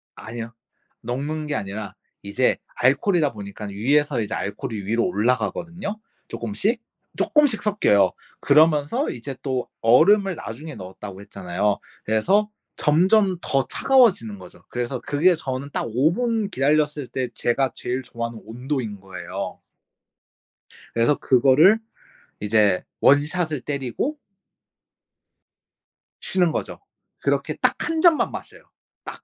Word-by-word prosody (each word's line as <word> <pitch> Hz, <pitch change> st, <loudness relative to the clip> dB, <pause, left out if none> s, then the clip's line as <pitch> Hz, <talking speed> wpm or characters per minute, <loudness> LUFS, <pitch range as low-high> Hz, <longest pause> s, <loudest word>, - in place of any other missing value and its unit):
아니요. 115 Hz, +1 st, -7 dB, 0.5 s
녹는 145 Hz, +6 st, -3 dB
게 150 Hz, -, -2 dB
아니라 100 Hz, +1 st, -5 dB, 0.3 s
이제 110 Hz, +6 st, +1 dB, 0.2 s
알코올이다 145 Hz, +4 st, +2 dB
보니깐 100 Hz, 0 st, -7 dB
위에서 135 Hz, +6 st, +1 dB
이제 105 Hz, -1 st, -4 dB
알코올이 105 Hz, 0 st, -4 dB
위로 115 Hz, +3 st, +1 dB
올라가거든요, 170 Hz, -, -1 dB, 0.3 s
쪼금씩. 220 Hz, +3 st, -1 dB, 0.4 s
쪼끔씩 290 Hz, -8 st, +2 dB
섞여요. 105 Hz, -, +3 dB, 0.3 s
그러면서 155 Hz, -, +3 dB
이제 130 Hz, +3 st, -6 dB
또 130 Hz, -3 st, -2 dB
얼음을 190 Hz, -, +5 dB
나중에 155 Hz, 0 st, -8 dB
넣었다고 95 Hz, +1 st, -9 dB
했잖아요. 100 Hz, 0 st, -2 dB, 0.3 s
그래서 190 Hz, -, +2 dB, 0.3 s
점점 185 Hz, +5 st, +3 dB
더 135 Hz, -3 st, 0 dB
차가워지는 200 Hz, -, +3 dB
거죠. 90 Hz, -1 st, -14 dB
그래서 125 Hz, +1 st, -3 dB
그게 165 Hz, +6 st, +3 dB
저는 135 Hz, -2 st, -5 dB
딱 -, -, -1 dB
5 130 Hz, +9 st, +2 dB
분 225 Hz, -2 st, -1 dB
기다렸을 150 Hz, -1 st, +1 dB
때 125 Hz, +2 st, -2 dB
제가 130 Hz, +2 st, 0 dB
제일 125 Hz, +2 st, -3 dB
좋아하는 115 Hz, -2 st, -5 dB
온도인 120 Hz, -3 st, -4 dB
거예요. 95 Hz, 0 st, -6 dB, 1.3 s
그래서 115 Hz, +5 st, +3 dB
그거를 140 Hz, -, +5 dB, 0.6 s
이제 105 Hz, -2 st, +3 dB, 0.2 s
1 145 Hz, +1 st, +5 dB
샷을 155 Hz, -3 st, -2 dB
때리고 140 Hz, -, -3 dB, 2.0 s
쉬는 180 Hz, -3 st, +1 dB
거죠. -, -, -4 dB, 0.4 s
그렇게 -, -, 0 dB
딱 -, -, +2 dB
1 325 Hz, -1 st, 0 dB
잔만 335 Hz, -3 st, +4 dB
마셔요 -, -, -10 dB, 0.4 s
딱. -, -, -9 dB
135 Hz, 275 characters per minute, -23 LUFS, 115-175 Hz, 2.0 s, 얼음을